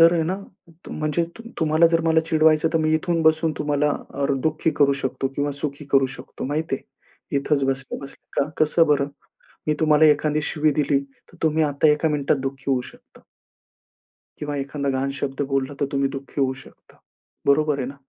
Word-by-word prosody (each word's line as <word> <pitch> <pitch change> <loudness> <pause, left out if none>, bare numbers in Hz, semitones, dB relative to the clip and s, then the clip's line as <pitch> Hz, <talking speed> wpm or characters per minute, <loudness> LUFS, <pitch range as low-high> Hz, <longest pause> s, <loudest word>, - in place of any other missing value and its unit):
तर 165 +1 +8
आहे 165 - +2
ना. 180 +4 -1 0.5
म्हणजे 155 +2 -1
तु - - -9 0.2
तुम्हाला 160 +1 +4
जर 165 - +4
मला 160 0 +4
चिडवायचं 160 -1 +4
तर, - - +4
मी 155 0 +1
इथून 165 +1 0
बसून 160 0 +3
तुम्हाला 150 0 +1 0.2
अ, 140 0 0 0.2
दुःखी 155 +1 +1
करू 140 -1 +6
शकतो 135 +1 -1
किंवा 145 0 0
सुखी 145 0 -4
करू 135 -1 +5
शकतो, 125 - -8
माहिती 150 +1 -1
आहे? 140 - -10
इथेच 140 0 +1
बसल्या-बसल्या. 135 +1 -3
का - - -8 0.2
कसं 165 +2 +3
बरं? 140 -1 +2 0.6
मी 150 - +2
तुम्हाला 155 -1 +5
एखादी 150 0 +3
शिवी 155 0 +2
दिली 140 -1 +2
तर, 140 -1 -18
तुम्ही 160 0 +2
आता 145 +1 +2
1का 150 +2 +1
मिनिटात 145 -1 +1
दुःखी 135 0 -6
होऊ 130 -2 +2
शकता. - - -21 1.2
किंवा 145 -1 -4
एखादा 140 +1 -3
घाण 135 +1 -1
शब्द 135 -1 -3
बोलला, 135 +1 -1
तर 140 - +2
तुम्ही 140 0 +1
दुःखी 140 +1 -6
होऊ 130 -1 +2
शकता, - - -20 0.5
बरोबर 150 0 +3
आहे 130 - -2
ना? 140 - -7
150 Hz, 180 wpm, -23 LUFS, 140-155 Hz, 1.2 s, तर